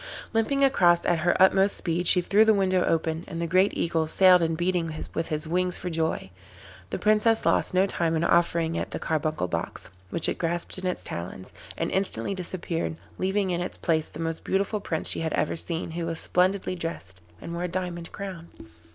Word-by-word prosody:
Limping 275 +5 +1
across 175 -11 +4
at 175 -2 +2
her 175 +2 +1
utmost 190 +1 +4
speed 175 +1 -1
she 180 - +5
threw 200 +4 +4
the 220 -1 +4
window 185 -2 +2
open, 160 0 0
and 165 - -6
the 170 - -1
great 185 +4 +3
Eagle 165 -1 0
sailed 180 +2 +6
in 165 -1 0
beating 175 -1 0 0.2
with 165 - -2
his 155 +1 -3
wings 180 +2 0
for 180 - -5
joy. 160 - -2 0.6
The - - -3
Princess 215 +2 +2
lost - - +2
no 185 +1 +5
time 170 -4 -1
in 160 - 0
offering 170 -1 +2
it - - -3
the - - -4
carbuncle 155 - -1
box, 85 -1 -4 0.2
which 165 - 0
it - - -2
grasped 170 +2 -2
in 185 - -3
its 180 - -2
talons, 90 +2 -6 0.2
and - - -2
instantly 190 - 0
disappeared, 175 -3 -3 0.2
leaving 190 0 0
in 175 0 -1
its 180 - -5
place 160 -2 0
the 150 - -11
most 165 0 -3
beautiful 200 +2 0
Prince 165 -5 -2
she - - +3
had 160 -1 -2
ever - - 0
seen, 165 0 -2
who 165 0 -3
was 165 -1 -3
splendidly 185 +1 +1
dressed, 165 - -5 0.2
and 170 - -7
wore 175 +1 -2
a - - -1
diamond 175 -1 -4
crown. 190 -4 -7
175 Hz, 205 wpm, -26 LUFS, 165-185 Hz, 0.6 s, sailed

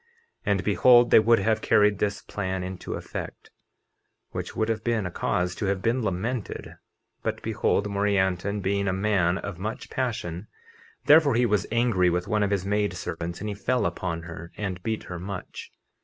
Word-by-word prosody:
50:30 470 - -39 0.4
And 100 -2 +2
behold, 120 +4 +5
they - - +9
would 115 +2 +5
have 110 +2 +1
carried 105 -1 +3
this 100 -1 -1
plan 95 -2 -3
into 95 0 -5
effect, - - -7 0.8
(which - - -5
would 110 - 0
have 110 -1 -2
been 115 -4 0
a 90 - -3
cause 90 +1 -1
to 105 - -4
have 95 0 -1
been 120 +3 +1
lamented) 110 +3 -3 0.4
but - - -2
behold, 100 - +1
Morianton 100 -1 0
being 100 +1 0
a 95 - +1
man 95 -3 +1
of 95 -3 -6
much 110 +5 -5
passion, 105 - -3 0.6
therefore 150 -4 +6
he 120 +1 +3
was 105 -5 +1
angry 115 -6 +3
with 90 +1 -1
one 105 0 +1
of 100 - +2
his 100 -2 -1
maid 105 -1 0
servants, 85 +1 -5
and 105 - -3
he - - -2
fell 125 +5 0
upon 85 -1 -3
her 85 0 -9
and 95 -3 -4
beat 110 +3 -2
her 90 -1 -7
much. 95 +1 -7
100 Hz, 185 wpm, -26 LUFS, 90-110 Hz, 0.8 s, they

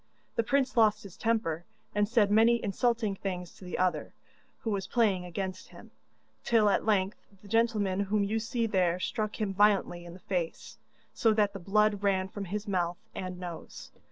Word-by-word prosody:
The - - +3
prince 265 +3 +1
lost 215 -2 +4
his 195 -3 -11
temper, 220 -8 0 0.3
and 205 0 +1
said 220 -4 +3
many 230 +2 +5
insulting 220 +1 0
things 180 -3 -5
to - - -16
the 180 - -4
other, 180 -5 0 0.5
who 225 - -2
was 195 -2 -2
playing 200 -7 +2
against 185 +1 -5
him, - - -14 0.5
till 220 -3 +4
at - - 0
length 200 -1 +1 0.2
the - - -13
gentleman 210 -3 +1
whom 200 +1 +1
you 215 +3 0
see 230 +1 -1
there 185 -5 +1
struck 215 +3 -3
him 205 -3 -1
violently 195 -3 +3
in 170 0 -10
the - - -12
face, 180 -2 -4 0.3
so 225 -2 +3
that 205 -2 +2
the 195 - -6
blood 205 +2 +2
ran 190 -2 +1
from 200 0 -6
his 205 +3 -4
mouth 175 -3 0 0.2
and 185 -1 -5
nose. 175 -2 -8
200 Hz, 185 wpm, -30 LUFS, 185-220 Hz, 0.5 s, many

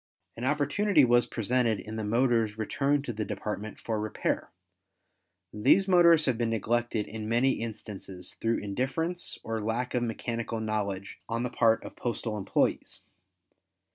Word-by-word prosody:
An 120 - -4
opportunity 150 +4 +3
was 120 0 +4
presented 115 -1 +1
in 110 0 -7
the 110 - -3
motors 115 -1 +2
returned 140 +6 0
to 120 - -3
the 110 0 -2
Department 105 0 -5
for 110 -2 -2
repair. 105 0 -2 1.0
These 190 - +4
motors 170 -4 +6
have 125 -4 0
been 115 -1 +1
neglected 115 0 0
in 110 -1 -6
many 120 +4 +3
instances 100 -5 -7
through 115 +1 0
indifference 135 - -2
or 115 0 -3
lack 115 +4 -2
of 125 - +1
mechanical 115 0 -3
knowledge 100 -3 -3
on 115 +1 -1
the 125 - -2
part 115 -2 +3
of - - -9
postal 115 -2 -3
employes. 100 -2 -1
115 Hz, 145 wpm, -29 LUFS, 110-125 Hz, 1.0 s, motors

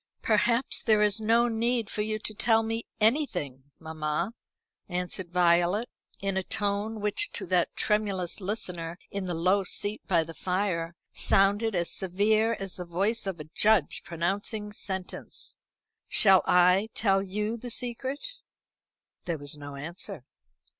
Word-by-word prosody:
"Perhaps 235 +3 +2
there 215 -2 +4
is 210 +1 +2
no 230 +2 +3
need 230 0 0
for 210 - -3
you 215 0 -1
to 215 0 -5
tell 225 +1 +3
me 225 +1 -3
anything, 190 - 0
mamma," 160 +4 -3 0.6
answered 180 0 -3
Violet, 175 +5 +2 0.3
in 195 -1 0
a - - +2
tone 205 +3 -2
which, 210 - +4
to - - -5
that - - +1
tremulous 205 -3 -1
listener 180 -4 -4
in 200 -1 -3
the 175 -2 -2
low 185 +4 +2
seat 205 +3 -1
by 170 -4 +3
the 165 +1 -9
fire, 180 -2 -2 0.2
sounded 205 +2 +3
as 170 -1 +1
severe 215 +4 +2
as 195 -1 -4
the 180 - -6
voice 195 +6 0
of 185 -4 -3
a - - -5
judge 210 -8 +3
pronouncing 200 +5 -2
sentence. 190 -3 -5 0.5
"Shall 195 -3 +7
I 180 +4 +4
tell 195 -3 +2
you 210 +3 -2
the 245 +1 -7
secret?" 255 - -3 1.0
There 170 -2 -2
was 145 0 -6
no 145 -1 -9
answer. 165 +1 -7
195 Hz, 145 wpm, -28 LUFS, 175-220 Hz, 1.0 s, Shall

